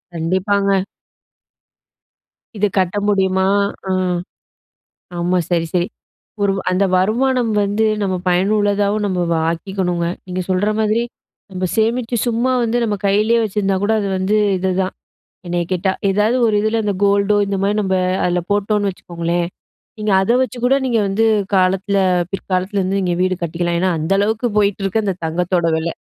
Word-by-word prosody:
கண்டிப்பாங்க. 190 +3 +1 1.8
இது 210 +1 +2
கட்ட 185 +2 0
முடியுமா? 190 -1 +2 0.4
ஆ - - 0 1.3
ஆமா 180 +1 +1
சரி 170 -1 +1
சரி, 175 0 +2 0.6
ஒரு 200 - +3 0.2
அந்த 185 +2 +2
வருமானம் 240 +5 +1
வந்து 205 +2 0 0.2
நம்ம 190 -2 0
பயனுள்ளதாவும் 205 +2 +1
நம்ம 185 -2 -1
வ - - +2 0.2
ஆக்கிக்கணுங்க, 175 0 -2 0.2
நீங்க 185 0 -3
சொல்ற 185 +3 +1
மாதிரி 220 +2 +1 0.5
நம்ம 185 0 -3
சேமிச்சு 230 +2 0
சும்மா 240 +2 +1
வந்து 235 +1 0
நம்ம 215 -2 0
கையிலயே 215 +4 +3
வச்சிருந்தா 200 -2 0
கூட 210 +2 +1
அது 200 - -2
வந்து 190 +3 +1 0.2
இதுதான், 185 0 -1 0.5
என்னய 175 0 -1
கேட்டா. 185 +1 +1 0.2
ஏதாவது 210 +5 +2
ஒரு 210 - +1
இதுல 220 +1 0
அந்த 205 -2 -1
கோல்டோ, 200 +1 +3
இந்த 195 - -1
மாதிரி 205 +2 +1
நம்ம 190 -1 0 0.3
அதுல 180 0 +1
போட்டோம்னு 205 0 +1
வச்சுக்கோங்களேன். 170 -1 -3 0.5
நீங்க 210 -1 -1
அத 195 +5 +1
வச்சு 250 0 -6
கூட 265 +2 +4
நீங்க 235 -3 +1
வந்து 195 +3 0 0.3
காலத்துல 190 +2 +2 0.3
பிற்காலத்துல 190 +1 -1
வந்து 190 +2 -1
நீங்க 180 -2 0
வீடு 185 -1 0
கட்டிக்கலாம். 170 +1 -1
ஏன்னா 185 -1 +2
அந்த 160 +5 -3
அளவுக்கு 220 +4 0
போயிட்டு 200 -1 0
இருக்கு 215 +3 0
அந்த 195 - -1
தங்கத்தோட 175 +2 0
விலை. 160 +1 -2
195 Hz, 145 wpm, -18 LUFS, 185-210 Hz, 1.8 s, கூட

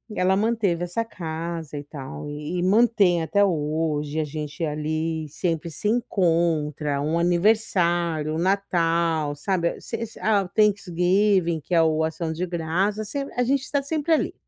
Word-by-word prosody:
ela 185 +1 +2
manteve 205 -6 +1
essa 175 +6 -2
casa 165 -5 -5
e 145 - -5
tal 145 0 -8
e 150 +4 -4
e - - 0
mantém 200 -4 +4
até 200 +5 +2
hoje, 155 -3 -1
a 155 - +1
gente 150 +2 -5
ali 155 +1 -2
sempre 165 +1 -2
se 205 - -3
encontra, 165 - +1
um 155 +3 0
aniversário, 175 -4 +1
um - - -1
Natal, 170 -5 +1
sabe, 170 +2 -1
se 230 - -5 0.2
a 210 -2 +2
o 180 - -9
Thanksgiving, 190 -3 +2
que 180 - -6
é 165 - +6
o 160 0 +2
Ação 160 +1 -2
de 180 +3 -2
Graças, 185 +5 -1
se 280 - -3 0.2
a 245 - +2
gente 270 +2 0
tá 285 -1 +2
sempre 310 +3 -2
ali. - - +1
170 Hz, 160 wpm, -24 LUFS, 155-200 Hz, 0.2 s, é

